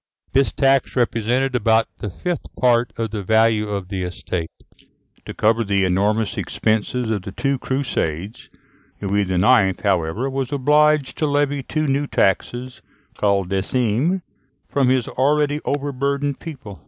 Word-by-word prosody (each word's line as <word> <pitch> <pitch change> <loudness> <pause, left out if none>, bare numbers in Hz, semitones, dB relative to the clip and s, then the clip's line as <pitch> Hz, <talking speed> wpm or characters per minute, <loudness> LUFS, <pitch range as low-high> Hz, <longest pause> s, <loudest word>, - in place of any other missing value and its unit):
This 135 0 +3
tax 135 -1 +2
represented 125 +2 +1
about 115 -1 +3
the 105 - -4
fifth 175 - -4
part 120 -1 +3
of 115 -2 -2
the 105 -2 -3
value 110 +1 +2
of 100 -3 -4
the 95 -2 -3
estate. 90 -2 -4 0.8
To - - -7
cover 115 +2 +2
the 100 -2 +1
enormous 100 +4 +1
expenses 110 +2 -1
of 105 -3 -1
the 95 - -7
two 135 +6 -1
crusades, 105 - -3 0.5
Louis 100 -1 0
IX., 95 +1 +3
however, 95 +4 0
was 135 -1 -3
obliged 150 0 +2
to 155 - +1
levy 145 -1 +1
two 155 +3 -2
new 140 +1 0
taxes, 120 +6 -1 0.3
called 100 -3 0
decimes, 120 - 0 0.5
from 135 -3 +1
his 130 -2 +2
already 145 +2 +1
overburdened 140 0 -1
people. 115 - -9
120 Hz, 140 wpm, -21 LUFS, 100-140 Hz, 0.8 s, This